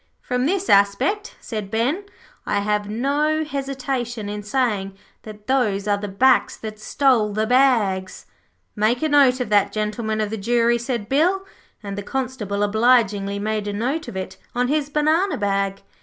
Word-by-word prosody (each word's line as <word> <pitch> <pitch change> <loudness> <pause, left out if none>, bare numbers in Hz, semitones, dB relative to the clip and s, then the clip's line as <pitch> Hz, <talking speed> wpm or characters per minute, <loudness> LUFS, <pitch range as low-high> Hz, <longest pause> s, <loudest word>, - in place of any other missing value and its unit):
'From 250 +1 -1
this 390 +3 -1
aspect,' 245 - +2
said 215 -4 -5
Ben, 255 - -1 0.4
'I - - +1
have 210 0 -1
no 290 +7 0
hesitation 265 -6 -4
in 210 0 -4
saying 210 -4 -1 0.2
that 210 -1 -11
those 215 -7 0
are 205 -1 +1
the 205 - -4
backs 250 +7 +3
that 215 -1 -8
stole 230 -3 +2
the 215 +1 0
bags.' 220 -7 +2 0.5
'Make 220 +6 +1
a 310 - +1
note 275 -3 +5
of 250 -4 -2
that, 205 -1 +3
Gentlemen 215 +1 -2
of 215 -1 -1
the 220 - -3
Jury,' 235 +3 +2
said 235 -3 -3
Bill, 355 - +2 0.4
and 200 -1 -5
the 205 - -4
Constable 220 -4 -3
obligingly 210 -2 +2
made 210 0 -2
a 205 - -2
note 265 +9 -2
of 190 - -6
it 190 0 -6 0.2
on 245 +1 +1
his 295 -1 0
banana 310 +6 +1
bag. 195 -1 -1
225 Hz, 165 wpm, -22 LUFS, 205-270 Hz, 0.5 s, note